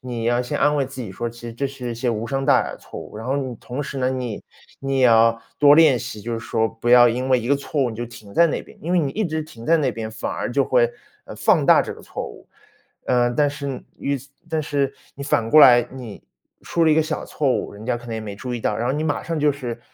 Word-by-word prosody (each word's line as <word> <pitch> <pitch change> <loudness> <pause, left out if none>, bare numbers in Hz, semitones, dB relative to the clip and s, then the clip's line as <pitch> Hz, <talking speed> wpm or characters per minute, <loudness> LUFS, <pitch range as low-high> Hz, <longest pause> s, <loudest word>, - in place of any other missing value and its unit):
你 120 -3 -5
要 120 +1 +2
先 125 - -3
安 150 - +3
慰 140 -3 0
自 130 -1 -7
己 95 -5 -7
说， 120 +5 -3
其 120 +1 -13
实 115 - -6
这 140 +5 -2
是 130 -3 -6
一 - - -4
些 120 +2 -2
无 115 0 -2
伤 135 +2 -2
大 140 - +5
雅 - - -5
的 - - -11
错 - - -10
误， 105 - -9
然 110 - -7
后 135 +2 0
你 130 -3 -3
同 125 +6 -5
时 140 -1 -6
呢， 130 0 +1
你 125 -5 -4 0.4
你 135 -1 -1
也 - - +5
要 115 -1 +5 0.2
多 145 0 +7
练 155 -6 +6
习， 110 -4 -7
就 120 - -4
是 115 - -2
说 115 -1 0
不 115 +1 -5
要 120 0 +8
因 125 +2 0
为 130 -1 +4
一 120 - -5
个 140 - +3
错 140 +1 -2
误， 120 - -1
你 110 - -8
就 120 - -4
停 110 -3 -13
在 170 +7 +5
那 - - -2
边。 - - -17
因 170 - -5
为 180 - +4
你 145 -4 0
一 215 -1 -1
直 160 -1 -2
停 120 -7 -12
在 165 - +5
那 140 -6 0
边， 110 0 -5
反 110 - -4
而 - - -3
就 135 +2 +2
会， 120 -2 +3 0.3
呃， - - -10
放 - - +3
大 - - +6
这 - - -5
个 - - -13
错 - - -6
误。 - - -12 0.6
嗯， 120 -1 +2
但 145 +1 +3
是 140 -3 -5 0.2
于 140 0 -1
此 135 +3 -15 0.2
但 160 -1 -1
是 140 -2 -1 0.2
你 140 - -7
反 115 -5 +1
过 155 - +7
来， 125 -3 +8
你 125 -6 -9 0.4
出 170 -1 0
了 160 - +4
一 - - +5
个 160 - +4
小 155 - -4
错 145 -3 -1
误， - - -3
人 105 +2 -11
家 125 -1 0
可 120 - -12
能 115 - -4
也 110 - -3
没 105 -2 -7
注 125 +3 -5
意 120 - -4
到， - - -1
然 120 - -2
后 130 - +1
你 150 +2 -2
马 150 -2 -1
上 165 -2 -3
就 150 0 +4
是， 125 -4 -5
125 Hz, 320 characters per minute, -22 LUFS, 115-140 Hz, 0.6 s, 要